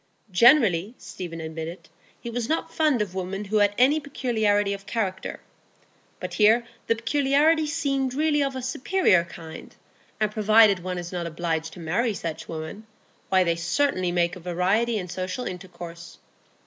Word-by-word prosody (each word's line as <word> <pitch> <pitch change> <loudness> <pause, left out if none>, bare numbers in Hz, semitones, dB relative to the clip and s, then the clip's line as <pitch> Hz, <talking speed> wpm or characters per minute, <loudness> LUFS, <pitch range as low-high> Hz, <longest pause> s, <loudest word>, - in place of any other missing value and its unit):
Generally, 220 - +5
Stephen 170 -3 -8
admitted, 160 +2 -6 0.3
he - - -9
was 235 0 -3
not 320 - -1
fond 300 -8 +2
of 190 -3 -9
women 190 +2 -4
who 215 +2 0
had 205 -1 +3
any 275 +5 +4
peculiarity 220 -8 0
of 200 0 -9
character, 190 -5 -3 0.8
but - - -6
here 225 +3 +4 0.2
the 230 - +3
peculiarity 290 +6 +2
seemed 275 -4 -1
really 300 0 +2
of 275 -1 -1
a 260 - -5
superior 260 - +2
kind, 165 -2 -11 0.4
and 215 -1 +1
provided 215 -2 +5
one 180 +1 -4
is 175 0 -6
not 175 -2 -3
obliged 165 -1 -3
to - - -11
marry 200 +8 0
such 165 -4 -5
women, 165 +7 -7 0.4
why, 190 -1 +4
they 170 -1 +1
certainly 180 +2 0
make 175 0 +1
a - - -9
variety 190 +7 0
in 180 -3 -4
social 185 +7 -4
intercourse. 175 -3 -8
205 Hz, 160 wpm, -25 LUFS, 175-250 Hz, 0.8 s, Generally